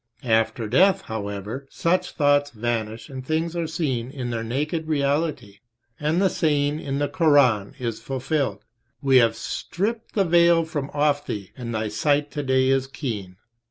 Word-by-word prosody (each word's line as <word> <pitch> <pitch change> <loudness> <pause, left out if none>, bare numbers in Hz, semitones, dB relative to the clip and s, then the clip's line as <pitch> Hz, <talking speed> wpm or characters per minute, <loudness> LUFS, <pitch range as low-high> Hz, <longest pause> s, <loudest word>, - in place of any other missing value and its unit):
After 115 0 +1
death, 185 - +4
however, 105 +4 -5
such 180 +2 0
thoughts 145 -1 +3
vanish 115 -2 -3
and 130 -1 -7
things 160 +4 -1
are 170 -1 -1
seen 130 -7 -2
in 130 -3 -5
their 115 -1 -2
naked 150 +7 -2
reality, 140 -7 -1 0.4
and 155 +3 +1
the 195 - +4
saying 150 -4 +1
in 140 -3 -3
the 145 0 +1
Koran 140 - +3
is 115 -3 -3
fulfilled: 130 -4 -2 0.4
"We 135 -1 +5
have 115 -2 +4
stripped 220 +6 -3
the 200 -2 +3
veil 170 -1 +4
from 145 -3 -4
off 145 0 +1
thee 100 -3 -5
and 120 -2 -6
thy 110 0 -1
sight 145 +6 +1
today 130 -2 +1
is 135 0 +2
keen." 110 -10 -5
140 Hz, 160 wpm, -24 LUFS, 115-155 Hz, 0.4 s, We